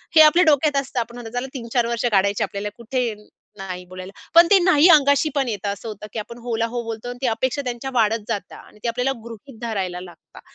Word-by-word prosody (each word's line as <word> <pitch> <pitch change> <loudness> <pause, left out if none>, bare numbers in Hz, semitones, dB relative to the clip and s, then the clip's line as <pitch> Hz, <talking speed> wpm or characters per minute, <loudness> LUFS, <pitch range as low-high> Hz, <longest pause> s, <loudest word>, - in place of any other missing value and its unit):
हे 315 - +9
आपल्या 335 +4 +7
डोक्यात 295 -1 +3
असतं 260 -2 -4
आपण 235 +1 -5
आता 230 -2 -8
चला 265 - -5
३-4 240 -1 -1
वर्ष 235 0 -2
काढायचे 200 0 +2
आपल्याला, 200 +1 -4
कुठे 240 0 -2 0.4
नाही 185 -2 -6
बोलायला. 185 +1 -9 0.2
पण 340 0 +8
ते 400 - +8
नाही 345 -2 +5
अंगाशी 285 0 +5
पण 275 -2 +1
येतं. 210 -3 -3
असं 200 +3 -6
होतं 210 -1 -7
की - - -3
आपण 235 +3 -8
हो 240 -2 -2
ला 230 - +1
हो 240 - -1
बोलतो 225 +1 -6
आणि 245 - -7
ती 255 - +1
अपेक्षा 260 +5 -1
त्यांच्या 245 +2 -4
वाढत 225 -2 +2
जातात. 195 -3 -4
आणि 210 - -17
ते - - -1
आपल्याला 250 +3 0
गृहीत 235 +2 -11
धरायला 190 -6 -3
लागतात. 175 -2 -14
235 Hz, 230 wpm, -22 LUFS, 210-270 Hz, 0.4 s, हे